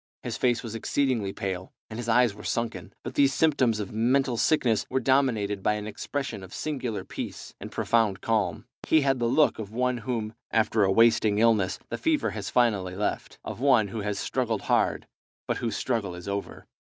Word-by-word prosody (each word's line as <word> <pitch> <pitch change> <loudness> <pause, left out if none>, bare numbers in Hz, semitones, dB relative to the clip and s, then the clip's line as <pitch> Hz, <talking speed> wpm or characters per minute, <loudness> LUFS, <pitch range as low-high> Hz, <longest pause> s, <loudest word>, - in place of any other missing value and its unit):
His - - -3
face 120 -1 +1
was 115 -2 -6
exceedingly 115 -3 0
pale, 95 -2 -5
and 110 +1 -7
his 120 -1 -4
eyes 120 -1 +4
were 105 +1 -12
sunken. 115 -1 -3
But 120 - -5
these 140 0 +3
symptoms 130 -8 +2
of 105 - -4
mental 125 +3 +2
sickness 115 -3 +2
were 130 - +1
dominated 120 -7 +1
by 105 - +2
an 105 0 -4
expression 135 +2 -4
of 95 - -10
singular 130 -8 -3
peace - - -7
and - - -8
profound 110 -5 +1
calm. 110 -5 -1 0.2
He 160 - +5
had 135 -2 +1
the 120 - +1
look 150 +2 +3
of 105 -3 -5
one 125 +2 0
whom, 110 -2 -3 0.2
after 110 -1 +2
a 95 - +3
wasting 110 -1 +4
illness, 105 -4 +3
the - - -4
fever 315 -2 +1
has 100 -3 -5
finally 100 -7 +1
left; 105 +2 -3
of - - -6
one 125 -6 +4
who 110 - -5
has 105 0 -2
struggled 115 0 -1
hard, - - +1 0.4
but - - 0
whose 115 -3 -2
struggle 100 -6 -1
is 90 +1 -9
over. 100 0 -4
115 Hz, 190 wpm, -27 LUFS, 105-125 Hz, 0.4 s, He